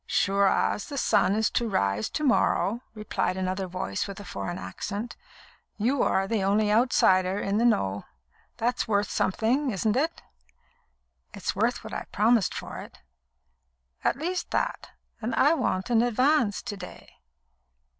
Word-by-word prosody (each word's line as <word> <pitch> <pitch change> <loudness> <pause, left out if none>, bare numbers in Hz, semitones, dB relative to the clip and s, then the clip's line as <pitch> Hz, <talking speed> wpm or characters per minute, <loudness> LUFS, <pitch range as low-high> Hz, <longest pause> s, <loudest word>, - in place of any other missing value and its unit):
"Sure 200 0 +2
as 205 - 0
the 285 - -5
sun 205 -5 +3
is 220 0 +1
to 235 -1 0
rise 100 - 0
to 305 - -3
morrow," 240 -4 +2
replied 210 -3 -2
another 185 0 -2
voice 185 +3 -3
with 200 0 -8
a - - -8
foreign 100 - -5
accent. 200 - -5 0.6
"You 245 +5 +1
are 190 0 +2
the 220 -1 0
only 205 +2 +2
outsider 190 -5 +3
in 205 +1 0
the 235 - +3
know. 100 - +1 0.5
That's 240 +2 0
worth 205 -1 +1
something, 245 +9 +1
isn't 210 0 0
it?" 315 +6 -1 1.1
"It's - - -3
worth - - 0
what - - -8
I've - - -6
promised 220 -2 +2
for - - -6
it." - - -11 1.1
"At - - +2
least 355 +5 -3
that. - - -2 0.3
And 230 +3 -2
I 295 +4 +5
want 190 - -1
an 230 -1 +5
advance 245 -1 +2
to 225 -4 -5
day." 180 -2 -11
210 Hz, 155 wpm, -27 LUFS, 190-240 Hz, 1.1 s, I